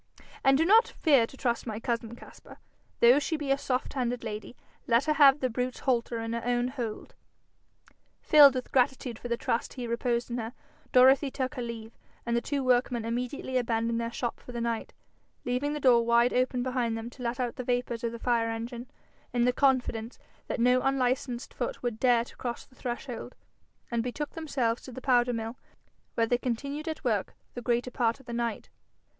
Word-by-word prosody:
And 270 0 +5
do 325 - +3
not 445 +6 +6
fear 275 -8 +3
to 270 - -15
trust 240 -1 -1
my 215 -1 -3
cousin, 230 -1 -3
Caspar, - - -14 0.5
although 245 +4 +8
she 310 +2 -2
be 290 -2 -2
a - - +5
soft 255 -2 -2
handed 245 -2 -2
lady. 220 +2 -6 0.3
Let 235 +2 +3
her 305 - +2
have 280 -1 +6
the 260 - +2
brute's 250 +1 -3
halter 240 -3 0
in 225 0 -3
her 235 - -3
own 245 +1 +1
hold.' 240 -5 -5 1.1
Filled 285 -3 +8
with 255 - -4
gratitude 250 -2 +1
for - - -6
the 235 -1 -1
trust 240 -2 -2
he 250 -2 -4
reposed 235 +1 -1
in 240 - -2
her, 225 +1 -5 0.4
Dorothy 265 +3 +6
took 260 +1 -3
her 260 - -5
leave, 230 -2 -6 0.3
and 235 0 0
the 235 - +2
two 280 +1 -2
workmen 245 -2 +2
immediately 250 +2 -2
abandoned 230 -1 0
their 230 0 -3
shop 240 0 -3
for - - -11
the 240 - -4
night, 230 -1 -2 0.5
leaving 250 +4 -1
the 300 - -3
door 245 -4 +5
wide 235 +1 +3
open 250 0 +1
behind 245 -3 -1
them 225 +1 -6
to 255 - -13
let 240 +1 -2
out 245 -2 -2
the 255 - -3
vapours 245 -1 -1
of 235 - -1
the 235 - -6
fire 230 -1 +1
engine, 235 +2 -5 0.4
in 240 -1 +2
the 250 - +3
confidence 250 -4 +1 0.3
that - - -3
no 250 +2 +4
unlicensed 255 -1 -1
foot - - -4
would 235 -3 -2
dare 245 -2 +4
to - - -15
cross 240 -2 -5
the - - -26
threshold, 245 -1 -6 0.6
and 235 -1 +1
betook 265 +5 -4
themselves 265 -8 -1
to 260 - -10
the 250 - -7
powder 245 -2 +3
mill, 225 +1 -4 0.6
where 230 - +3
they 245 +1 +1
continued 280 +6 -3
at 315 -1 -4
work 220 -7 -1 0.2
the 245 - -6
greater 240 +1 0
part 235 -1 0
of 270 - -18
the 235 - -7
night. 235 -2 -2
245 Hz, 200 wpm, -28 LUFS, 235-260 Hz, 1.1 s, although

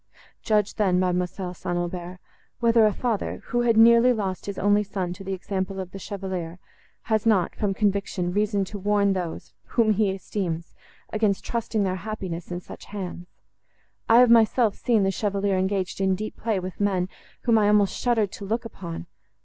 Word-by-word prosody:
Judge 210 -2 +1
then, 190 -4 +3
Mademoiselle 180 0 -1
St. 175 0 -3
Aubert, 175 +1 -4 0.4
whether 230 -2 +5
a - - +2
father, 225 0 -2
who 240 - +1
had 230 -2 +3
nearly 235 +2 +7
lost 195 -6 -2
his 200 - -4
only 205 +1 +3
son 190 -3 -3
by 180 +2 -8
the 195 0 -3
example 190 0 -3
of 185 -1 -5
the 195 - -8
Chevalier, 185 -4 -5 0.5
has 220 0 0
not, 195 -6 +2
from 200 -2 -1
conviction, 200 -3 0
reason 205 -1 +1
to 205 +2 -7
warn 200 0 +2
those, 180 -3 -5
whom 225 -3 +2
he 210 -1 +2
esteems, 185 -3 -4 0.4
against 210 -3 +1
trusting 230 -2 -1
their 185 -1 -1
happiness 185 -4 -5
in 175 0 -4
such - - -11
hands. 185 -3 -6 0.8
I 225 - +7
have 250 -2 +6
myself 225 -1 +4
seen 230 -4 +1
the 195 - +2
Chevalier 200 -1 0
engaged 190 0 -1
in 190 -1 +2
deep 215 +3 -5
play 220 -4 -1
with 185 0 -7
men, 190 -3 +1 0.3
whom 230 -2 +3
I 205 - +3
almost 205 -1 +3
shuddered 225 -5 +1
to - - -9
look 225 +4 -2
upon. 170 - -7
200 Hz, 180 wpm, -25 LUFS, 185-215 Hz, 0.8 s, nearly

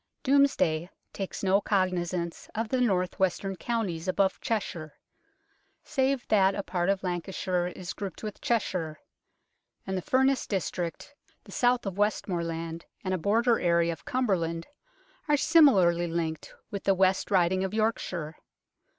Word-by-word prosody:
Domesday 185 - +3 0.2
takes 195 0 -5
no 195 +1 +3
cognizance 180 -3 -1
of 225 +1 -2
the 255 +1 +1
north 185 -5 +1
western 190 +1 0
counties 190 -6 -2
above 190 +1 +1
Cheshire, 170 -8 -3 0.9
save 265 -2 0
that 195 -2 +4
a 200 - -3
part 180 -1 -1
of 195 -1 0
Lancashire 180 0 -2
is 180 +1 -6
grouped 200 0 -7
with 210 -2 -6
Cheshire; 180 -9 -1 0.9
and 190 - -3
the 185 - -1
Furness 265 +5 +2
district, 180 - -3 0.3
the - - -14
south 245 -1 +2
of 195 0 -4
Westmoreland 170 -5 -1 0.2
and 185 -1 -1
a 185 - 0
border 230 +6 +2
area 170 -1 +2
of 155 - -13
Cumberland 170 -10 -1 0.6
are 295 -1 +4
similarly 195 - +5
linked 165 -2 -3 0.2
with 200 -2 -5
the 195 - +4
West 190 0 +2
Riding 185 -1 +3
of 190 - -2
Yorkshire. 185 -8 -2
190 Hz, 140 wpm, -28 LUFS, 175-215 Hz, 0.9 s, similarly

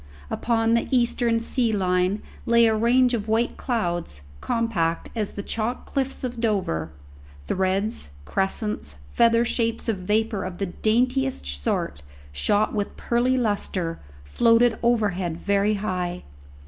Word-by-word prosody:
Upon 230 -1 +1
the 235 - +2
eastern 235 -2 +2
sea 235 0 0
line 185 0 +1 0.2
lay 235 0 +5
a 220 - +4
range 245 +3 +3
of 220 -3 -2
white 225 +2 +1
clouds, 175 - -2 0.2
compact 220 -9 -1
as 215 -3 -2
the 200 - -5
chalk 225 +4 -2
cliffs 270 -1 -3
of 245 -2 -4
Dover; 190 - 0 0.6
threads, 190 - -1 0.2
crescents, 190 - -2 0.2
feather 230 0 +4
shapes 230 -1 -1
of 225 -3 0
vapour 210 +2 0
of 185 -1 -5
the 200 - -1
daintiest 250 +8 0
sort, 70 0 -2 0.3
shot 205 - +1
with 205 -1 -3
pearly 245 +2 +1
lustre, 195 -7 -1 0.3
floated 230 - +3
overhead 200 -8 +1
very 200 +3 +1
high. 180 -3 -3
215 Hz, 130 wpm, -24 LUFS, 185-235 Hz, 0.6 s, lay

